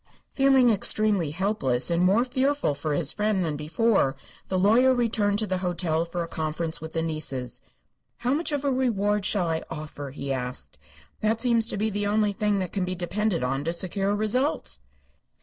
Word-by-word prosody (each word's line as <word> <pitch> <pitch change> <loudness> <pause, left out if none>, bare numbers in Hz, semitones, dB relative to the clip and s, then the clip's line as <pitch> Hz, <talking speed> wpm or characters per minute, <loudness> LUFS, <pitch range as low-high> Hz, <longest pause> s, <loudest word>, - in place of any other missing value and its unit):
Feeling 270 -3 +4
extremely 205 -4 +2
helpless 160 - 0
and 170 0 +2
more 200 +7 +4
fearful 270 - 0
for 145 +1 -2
his 150 -1 -1
friend 210 -3 0
than 155 -2 -2
before, 155 0 +1 0.3
the 185 - -1
lawyer 235 +7 +5
returned 215 -4 +1
to 215 - +1
the 185 -3 -2
hotel 170 -3 -1
for 170 0 -3
a - - -6
conference 160 0 -3
with 160 0 -7
the 165 - -1
nieces. 145 -6 -4 0.6
"How 250 +2 0
much 315 +2 -1
of 290 -1 -2
a 280 - +2
reward 210 -6 +1
shall 200 -4 +1
I 160 -1 -1
offer?" 150 -2 -7
he 140 0 -4
asked. 125 -1 -5 0.4
"That 220 +1 +1
seems 230 -2 +2
to - - -3
be 215 +2 0
the 205 0 -1
only 210 0 +2
thing 210 -1 0
that 185 -3 -3
can 195 - 0
be 185 0 -2
depended 185 -1 -1
upon 135 +2 -1
to 165 - 0
secure 195 +3 -1
results." 250 +8 -1
195 Hz, 185 wpm, -26 LUFS, 160-220 Hz, 0.6 s, lawyer